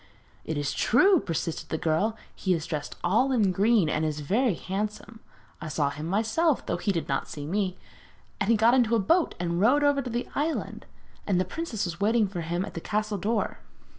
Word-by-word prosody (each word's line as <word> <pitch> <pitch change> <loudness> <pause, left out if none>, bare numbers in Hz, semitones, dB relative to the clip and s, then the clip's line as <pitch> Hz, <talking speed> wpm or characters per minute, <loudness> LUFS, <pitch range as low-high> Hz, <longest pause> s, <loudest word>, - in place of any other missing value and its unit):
'It 160 - -3
is 145 -1 -1
true,' 370 - +4
persisted 165 - -4
the 160 - -1
girl. 180 +9 0 0.2
'He 185 -2 0
is 160 -1 -4
dressed 155 -3 -4
all 220 +10 +2
in 215 -7 +3
green, 205 0 +3
and 155 +1 0
is 150 -1 -2
very 210 - +1
handsome. 210 +4 -5 0.4
I 160 - -5
saw 150 -2 0
him 150 +3 -6
myself, 225 - +1
though - - -1
he 205 - 0
did 170 -4 -2
not 135 -1 -1
see 145 -1 -7
me, 185 +2 -1 0.6
and 195 - 0
he 230 - +5
got 225 +3 +5
into 235 -3 +3
a - - +3
boat 330 - +2
and 170 0 -1
rowed 270 +7 +4
over 285 -1 +3
to 255 - -5
the 240 +1 -3
island, 305 +3 -3 0.4
and 190 -3 +2
the 185 - +1
princess 230 - -3
was 170 +1 -6
waiting 220 +1 +3
for 185 -3 -5
him 175 +3 -2
at - - -9
the 165 - -5
castle 215 0 -2
door.' 220 +5 -1
200 Hz, 210 wpm, -27 LUFS, 170-230 Hz, 0.6 s, he